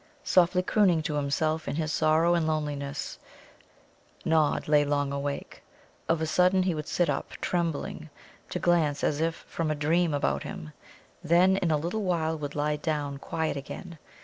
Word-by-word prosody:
Softly 180 0 +3
crooning 180 -5 +3
to 150 - -2
himself 155 +2 0
in - - -2
his 155 -1 -1
sorrow 160 +2 +3
and 170 -2 +1
loneliness, 145 -2 -3 1.1
Nod 160 -2 +2
lay 150 -1 +5
long 145 -1 0
awake. 140 0 -4 0.5
Of 165 -1 +2
a - - +1
sudden 180 +3 +3
he 180 -1 +1
would 150 -1 -5
sit 175 - +1
up, 145 - -2
trembling, 165 -2 -2 0.4
to - - -3
glance 160 -4 +2
as 150 +1 +1
if 165 0 -2
from 165 -2 -2
a 155 - 0
dream 165 +3 +2
about 145 - 0
him, 75 0 -7 0.5
then 180 +4 +4
in 180 - 0
a 155 - +3
little 175 +8 -2
while 165 -4 0
would 145 -2 -6
lie 150 0 0
down 145 -2 -2
quiet 160 +2 -2
again. 160 +4 -8
155 Hz, 170 wpm, -28 LUFS, 145-170 Hz, 1.1 s, lay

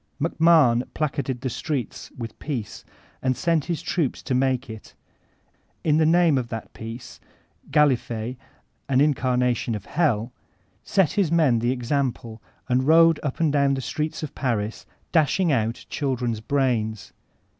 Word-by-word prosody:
MacMahon 155 -6 +3
placarded 135 -5 -2
the 130 - -2
streets 135 0 -4
with 115 -2 -7
peace 125 -9 -5 0.4
and 130 -1 0
sent 165 -4 +1
his 170 -4 -3
troops 160 -8 -1
to 130 - -2
make 130 -1 +1
it; 110 -2 -11 0.9
in 155 -1 +3
the 155 -1 +3
name 165 -4 +4
of 120 - -4
that 115 -2 -7
Peace, 115 +2 -9 0.5
Gallifet, 130 -5 +1 0.5
an 130 -1 +3
incarnation 125 -5 +1
of 105 - -7
hell, 125 -8 0 0.5
set 190 -7 +2
his 195 -6 +1
men 155 -9 +3
the 120 +1 0
example 125 -3 -2 0.3
and 130 +1 +1
rode 165 0 +6
up 145 -4 -4
and 160 -3 +2
down 140 -1 +3
the 135 - -3
streets 155 +4 -3
of 155 - -5
Paris, 115 -5 -2 0.2
dashing 165 +2 +2
out 115 -3 -1
children's 125 -6 -2
brains. 110 -6 -1
130 Hz, 145 wpm, -24 LUFS, 120-155 Hz, 0.9 s, rode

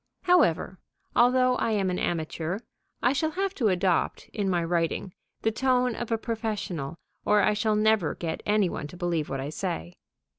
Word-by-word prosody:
However, 305 - +3 0.4
although 255 +1 +4
I 225 - 0
am 195 -3 +1
an 180 - -2
amateur, 165 +1 -2 0.5
I 250 - +4
shall 315 +3 +1
have 385 +4 -2
to 245 - +1
adopt, 185 -2 +1
in 205 -3 -2
my 175 -2 +1
writing, 170 +2 -1 0.3
the 225 - +3
tone 250 +1 +2
of 240 0 -5
a 225 - +3
professional, 215 - -3 0.3
or 210 -1 +4
I 210 - +4
shall 215 0 +1
never 215 -5 +2
get 165 -2 -4
any 210 -2 +3
one 150 - -4
to 180 - -12
believe 170 -4 -1
what 135 - -3
I 135 +2 -3
say. 85 - -4
205 Hz, 180 wpm, -27 LUFS, 170-235 Hz, 0.5 s, although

